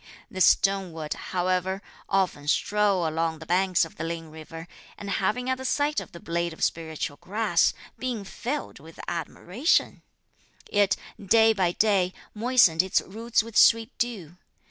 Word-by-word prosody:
"This 185 -1 +3
stone 195 -3 +3
would, 155 -2 -4
however, 185 +1 -1 0.3
often 185 -7 0
stroll 200 +1 +2
along 160 0 -1
the 160 - -11
banks 180 0 +2
of 165 - -14
the 160 - -4
Ling 165 -1 -5
river, 160 +1 -10 0.3
and 200 -1 -6
having 215 +7 0
at 260 0 0
the - - -6
sight 290 +3 +1
of - - -10
the 170 - -10
blade 170 0 -2
of - - -6
spiritual 160 -3 -2
grass 200 -3 +1 0.2
been 245 -5 -3
filled 260 +9 -5
with 160 +3 -15
admiration, 180 - 0 0.7
it, 205 -1 +2 0.3
day 225 +3 +5
by 185 -4 +1
day, 195 -4 +2 0.2
moistened 220 -7 +4
its 190 0 +1
roots 225 +3 -1
with 230 -1 -11
sweet 225 0 +5
dew. 190 -9 -3
190 Hz, 155 wpm, -26 LUFS, 165-220 Hz, 0.7 s, day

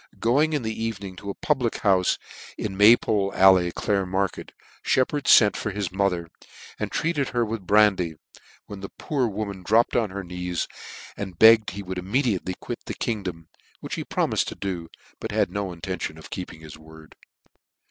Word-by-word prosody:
Going 145 +7 +2
in 145 -4 -1
the 110 0 -3
evening 100 -4 -4
to 100 +1 -7
a 100 - -4
pubiic 130 -6 -1
houfe 95 -3 +3 0.4
in 100 -3 -4
May 105 +4 +8
pole 100 -2 0
Alley, 95 -2 +6
Clare 100 0 -1
market, 95 +1 -2 0.3
Shep 130 - +2
pard 145 -1 -3
fent 105 -3 +7
for - - -3
his 100 -3 -3
mother, 90 -3 -1 0.5
and - - -3
treated 155 -4 0
her 120 -1 0
with 110 -4 -5
brandy, 100 -6 +3 0.5
when 100 - -9
the 100 - -7
poor 135 -5 -2
woman 100 -2 -4
dropped 110 +6 +2
on 115 -3 +2
her 100 +1 -6
knees, 90 -1 -3 0.5
and 95 -4 -6
begged 110 +1 +7
he 100 +2 -7
would 95 -1 -5
immediately 100 -2 -1
quit - - -6
the - - -4
kingdom, 90 -7 -4 0.3
which - - -7
he - - -3
promifed - - 0
to - - -5
do, 90 -4 -4 0.3
but - - -5
had - - +1
no 100 -2 -3
intention 85 -2 -5
of 80 - -13
keeping 90 -3 -7
his 80 -1 -11
word. 80 -1 -15
100 Hz, 180 wpm, -25 LUFS, 90-110 Hz, 0.5 s, May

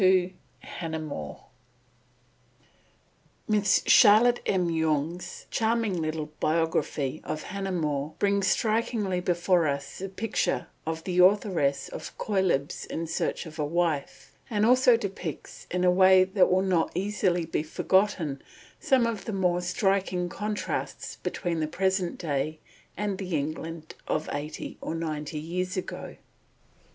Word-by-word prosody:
XXII 185 -1 +4 0.3
HANNAH 160 -2 -5
MORE 145 - -6 2.0
MISS 205 -3 +3
CHARLOTTE 235 +3 +7
M. 180 -3 +1
YONGE'S 160 +1 -1
charming 220 -5 +1
little 155 -1 -3
biography 155 -3 0
of 155 - -4
Hannah 195 0 -4
More 150 -4 -2
brings 200 -1 +2
strikingly 215 -3 +1
before 175 -1 +2
us 140 0 -3
the 195 +1 -4
picture 215 +3 -1 0.2
of 160 0 -3
the 180 0 -1
authoress 180 -7 +3
of - - -8
Cœlebs 190 -9 0
in 165 - -3
Search 165 - -2
of 160 0 -10
a - - +1
Wife, 160 -2 -2 0.2
and 215 -1 +2
also 250 0 +6
depicts 195 -7 -6
in 180 0 -1
a 180 - +5
way 185 0 +6
that 190 0 +3
will 185 +1 +3
not 180 -4 +1
easily 185 -3 0
be 160 - -1
forgotten, 165 -2 +1 0.4
some 265 -5 +3
of 225 -4 -3
the 220 - -3
more 180 -2 +1
striking 180 -1 0
contrasts 210 +3 -4
between 170 -3 -2
the 155 - 0
present 190 +1 0
day 155 -1 -2 0.4
and 205 -1 -2
the 185 -5 -1
England 160 +2 -5
of 155 - -1
eighty 150 +2 -5
or 165 - -3
ninety 155 -2 -4
years 180 +4 -3
ago. 185 - -5
180 Hz, 135 wpm, -27 LUFS, 160-195 Hz, 2.0 s, CHARLOTTE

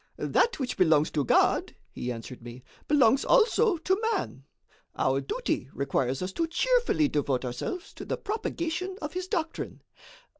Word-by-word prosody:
"That 475 - +1
which 255 -2 -3
belongs 160 -4 +4
to 150 - 0
God," 120 - +2 0.2
he 125 - -4
answered 120 +2 -8
me, 120 +1 -10 0.2
"belongs 270 -3 +4
also 460 -4 +4
to 380 +5 0
man. 135 - -4 0.5
Our 135 +1 +1
duty 135 0 -2
requires 135 0 -1
us 185 - -3
to 330 - -1
cheerfully 480 -3 +2
devote 140 - -1
ourselves 125 - -5
to - - -9
the - - -2
propagation 370 -3 -3
of 300 - -5
His 365 0 -3
doctrine. 335 -5 -3
275 Hz, 150 wpm, -28 LUFS, -, 0.5 s, belongs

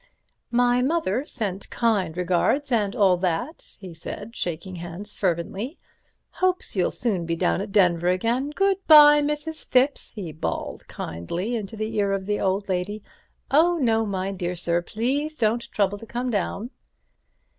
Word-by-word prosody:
"My 245 0 +3
mother 275 - 0
sent 200 -5 -4
kind 200 -8 0
regards 180 +11 +1
and 210 -2 +1
all 195 -6 +4
that," 185 - -3
he 185 -3 -9
said, 205 +7 -8
shaking 175 +2 -4
hands 175 +5 -7
fervently; 195 - -2 0.5
"hopes 370 -8 -1
you'll 180 -2 +2
soon 195 -8 -2
be 165 - 0
down 85 - +1
at - - -6
Denver 175 -4 +3
again. 230 +10 +1
Good 390 +4 +1
bye, 295 -1 +9
Mrs. 300 +2 -3
Thipps," 260 +3 +2
he 185 -7 -5
bawled 155 - -4
kindly 170 - -4
into 220 0 -5
the 215 +1 -3
ear 200 -1 +2
of 195 -1 -2
the 205 +1 -1
old 195 +1 0
lady. 195 +3 -2 0.5
"Oh, 340 +4 +4
no, 225 -6 +2
my 195 -2 -2
dear 180 -2 -3
sir, 170 0 0
please 275 - -2
don't 230 0 0
trouble 205 0 0
to 225 - -11
come 245 +2 -2
down." 210 +3 -2
210 Hz, 155 wpm, -24 LUFS, 180-250 Hz, 0.5 s, bye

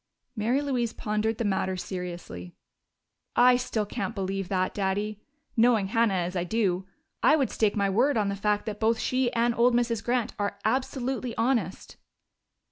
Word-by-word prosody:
Mary 235 +5 +1
Louise 250 -5 -1
pondered 215 +1 -1
the 230 - -1
matter 190 -1 0
seriously. 175 - -6 0.8
"I 250 +1 +6
still 235 -3 -1
can't 225 +2 -4
believe 195 -1 -2
that, 185 -1 0
Daddy. 205 +1 -2 0.3
Knowing 225 -4 +3
Hannah 225 -2 +2
as 180 0 -2
I 175 - 0
do, 190 -2 0 0.3
I - - +6
would 275 -5 0
stake 215 -2 +1
my 200 -1 +2
word 240 +7 +2
on 210 -2 +1
the 200 - -1
fact 210 +1 0
that 210 -1 -5
both 225 +1 +2
she 255 +1 0
and 235 +1 +2
old 235 +1 +3
Mrs. 235 -3 0
Grant 240 -2 0
are 200 0 -1
absolutely 255 0 -1
honest." 225 -6 -1
215 Hz, 165 wpm, -27 LUFS, 195-240 Hz, 0.8 s, I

